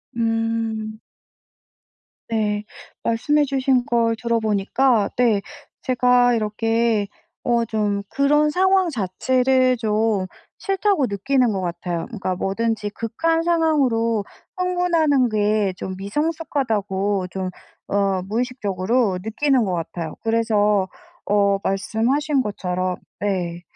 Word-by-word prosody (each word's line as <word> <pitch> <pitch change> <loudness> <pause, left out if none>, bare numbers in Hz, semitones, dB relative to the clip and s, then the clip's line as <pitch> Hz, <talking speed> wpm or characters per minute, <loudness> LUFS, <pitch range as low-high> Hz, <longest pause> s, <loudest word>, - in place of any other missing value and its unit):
음. 225 -1 -1 1.3
네. 210 -2 -1 0.4
말씀해 290 +6 +2
주신 265 -2 +1
걸 230 -1 +1
들어보니까 225 0 +1
네 225 -5 +3 0.4
제가 250 -1 +3
이렇게 225 -1 0 0.4
어 235 -1 +2
좀 210 -2 -1
그런 295 +2 +3
상황 375 +2 +3
자체를 255 - +1
좀 215 -3 +1 0.3
싫다고 390 -6 +1
느끼는 240 +3 +1
것 190 - -2
같아요. 175 -1 -3
그러니까 195 -6 -3
뭐든지 210 +2 -1
극한 325 +11 -1
상황으로 260 -11 +1 0.3
흥분하는 335 -8 +2
게 210 -2 +1
좀 190 0 -5
미성숙하다고 205 - -1
좀 190 -1 -3 0.4
어 195 -2 +1
무의식적으로 215 -2 0
느끼는 260 +3 +1
것 185 -3 -1
같아요. 165 -1 -4
그래서 210 -4 +2 0.4
어 200 -1 +3
말씀하신 250 +9 0
것처럼 185 -4 -2 0.2
네. 175 -4 -2
225 Hz, 230 characters per minute, -22 LUFS, 200-260 Hz, 1.3 s, 네